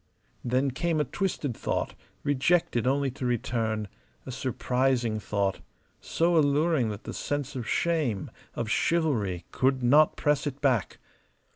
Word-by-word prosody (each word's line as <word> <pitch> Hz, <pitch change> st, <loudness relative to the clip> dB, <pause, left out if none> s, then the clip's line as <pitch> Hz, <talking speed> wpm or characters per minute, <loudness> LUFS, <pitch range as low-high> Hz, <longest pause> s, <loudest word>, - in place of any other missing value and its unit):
Then 130 Hz, +3 st, +1 dB
came 165 Hz, +4 st, 0 dB
a -, -, +3 dB
twisted 150 Hz, -, -2 dB
thought, -, -, -2 dB, 0.3 s
rejected 140 Hz, -3 st, +2 dB
only 135 Hz, 0 st, +1 dB
to 130 Hz, -, -8 dB
return; 115 Hz, -3 st, -1 dB, 0.4 s
a -, -, -6 dB
surprising 125 Hz, -3 st, 0 dB
thought, 100 Hz, -2 st, -1 dB, 0.4 s
so 170 Hz, +1 st, +1 dB
alluring 145 Hz, -3 st, +2 dB
that 105 Hz, -1 st, -6 dB
the -, -, -6 dB
sense 145 Hz, -1 st, -3 dB
of 120 Hz, -3 st, -4 dB
shame, 150 Hz, -, 0 dB, 0.2 s
of 115 Hz, -, -2 dB
chivalry, 110 Hz, -, 0 dB
could 130 Hz, 0 st, +1 dB
not 150 Hz, +5 st, +5 dB
press 150 Hz, 0 st, +1 dB
it 140 Hz, -1 st, -4 dB
back. 125 Hz, -9 st, +1 dB
130 Hz, 135 wpm, -28 LUFS, 115-150 Hz, 0.4 s, not